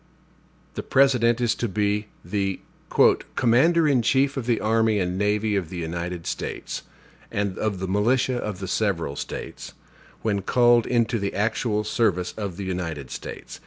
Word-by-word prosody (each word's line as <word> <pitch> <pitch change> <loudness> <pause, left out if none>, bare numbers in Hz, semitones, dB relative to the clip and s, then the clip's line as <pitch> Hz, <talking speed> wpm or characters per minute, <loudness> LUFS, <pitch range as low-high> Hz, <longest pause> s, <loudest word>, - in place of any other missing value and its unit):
The - - -4
President 125 -3 +3
is 120 -2 +2
to 120 - -2
be 105 +1 0 0.2
the 100 -2 -1 0.8
"commander 150 +7 +4
in 135 -4 +3
chief 135 +4 +2
of 130 -4 -4
the 120 -2 +2
army 110 0 +2
and 90 -1 -1
navy 105 +2 +1
of 90 -5 -1
the 90 - -6
United 85 +1 -4
States, - - -4 0.5
and 100 -2 -1
of 105 -3 -1
the 95 +1 -4
militia 120 +6 +2
of 105 -5 -4
the 95 0 -6
several 90 -8 -1
States, - - -7 0.5
when 100 -3 0
called 120 +3 +4
into 120 -1 +1
the 100 0 -3
actual 105 0 0
service 105 -5 0
of 100 -5 -5
the 100 - -4
United 85 -7 -4
States. - - -8
105 Hz, 160 wpm, -24 LUFS, 95-120 Hz, 0.8 s, commander